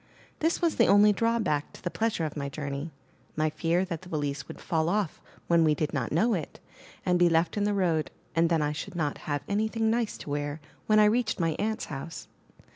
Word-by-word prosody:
This 330 +2 0
was 335 - +2
the - - +5
only 205 +1 +6
drawback 220 -10 0
to - - -14
the 175 - -2
pleasure 220 -7 0
of 155 - -5
my 140 -2 -3
journey 140 +1 -5 0.2
— - - -34
my 155 0 +1
fear 170 +4 +1
that 170 -4 -5
the 180 - -12
valise 145 -3 -2
would - - -9
fall 160 -2 0
off 200 -3 -1 0.2
when 170 -1 +4
we 155 -1 +4
did 150 0 -2
not - - -2
know 220 +10 +3
it, 165 -7 -4 0.5
and 180 -1 +3
be 175 -1 +5
left 165 0 +2
in 205 -1 +1
the 205 - +1
road, 170 -5 +1 0.3
and 165 0 +3
then 165 -3 +2
I 150 - 0
should 175 +5 -6
not 150 -4 -1
have 145 -1 -1
anything 220 +2 +1
nice 230 -1 0
to 145 - -8
wear 145 +1 -2 0.3
when 215 - +4
I 210 - +7
reached 220 0 +1
my 165 -1 +2
aunt's 220 +1 -1
house. 155 +3 -7
170 Hz, 225 wpm, -28 LUFS, 155-210 Hz, 0.5 s, I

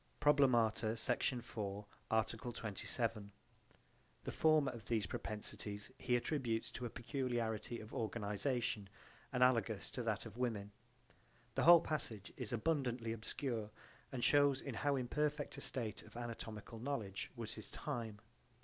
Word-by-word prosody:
(Probl. 145 -2 +6 0.5
Sect. 115 - +2
4 105 -4 -4 0.2
art. 110 +1 +2
27: 110 -1 -2 0.9
The - - -3
former 155 -4 +4
of 115 -4 -9
these 110 -4 +1
propensities 105 +2 -3
he 125 - +2
attributes 120 -3 0
to 125 - -3
a - - -6
peculiarity 120 -2 -2
of 110 - -10
organization, 110 0 -1 0.4
analogous 125 -4 +3
to - - -2
that - - 0
of - - -9
women. 105 -5 -1 0.8
The - - +2
whole 170 0 +11
passage 115 -10 -1
is 125 -5 -2
abundantly 120 -3 0
obscure 115 0 -3 0.4
and 125 -3 -3
shows 145 -2 +6
in 135 - -5
how 140 +5 +1
imperfect 145 +3 -1
a - - -8
state 115 -6 -1
of 110 +1 -12
anatomical 115 -2 -6
knowledge 110 -7 -3
was 115 -2 -4
his - - -6
time. 115 -7 -4
120 Hz, 130 wpm, -38 LUFS, 110-135 Hz, 0.9 s, whole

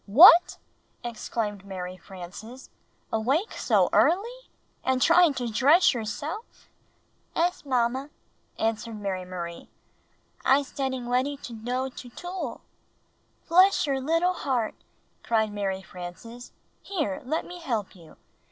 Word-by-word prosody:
"What!" 335 - +8 0.5
exclaimed 220 -3 -4
Mary 185 -2 -6
Frances. 195 +7 -11 0.4
"Awake 270 - +1
so - - +2
early 470 +8 +2
— - - -41
and 260 0 +1
trying 335 +1 +5
to 250 - -3
dress 280 - +5
yourself? 285 - -6 0.3
" - - -40
"'Es, 350 +2 0
Mamma," 255 +2 0 0.5
answered 225 0 -2
Mary 190 -2 -3
Marie. 175 -2 -7 0.7
"I'se 275 +1 +3
detting 260 -2 -3
weady 260 +4 0
to 240 - -7
doe 250 +4 -2
to 250 -1 -10
tool." 350 -2 -6 0.9
"Bless 370 +2 +5
your 270 -2 -1
little 330 +6 +2
heart!" 255 -9 -1 0.5
cried 220 -3 +1
Mary 195 -2 -2
Frances. 190 +7 -9 0.3
"Here, 305 - -3
let 310 +6 -2
me 355 0 -9
help 230 - -3
you!" 165 -3 -16
250 Hz, 125 wpm, -26 LUFS, 210-310 Hz, 0.9 s, What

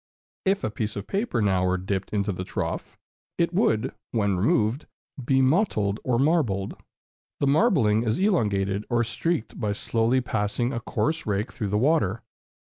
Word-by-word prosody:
If 195 +1 +1
a - - -1
piece 105 0 -3
of 100 - -5
paper 195 - -1
now 95 -2 +2
were 90 0 +1
dipped 95 +1 -3
into 100 -1 0
the 90 -1 -4
trough, - - -4 0.4
it 170 0 +1
would, 130 - +1 0.2
when 100 -4 +1
removed, 110 - +1 0.4
be 130 +2 +3
mottled 130 - +1
or 125 -2 +1
marbled. 130 - +1 0.6
The - - +1
marbling 140 - +3
is 110 -2 0
elongated 105 - +1
or 120 -1 +2
streaked 120 +1 -2
by 105 -1 0
slowly 115 +4 +1
passing 120 +1 -1
a 115 - -2
coarse 155 +6 -2
rake 105 +3 -1
through 115 -4 -4
the 105 - +1
water. 115 - +1
115 Hz, 160 wpm, -25 LUFS, 100-140 Hz, 0.6 s, be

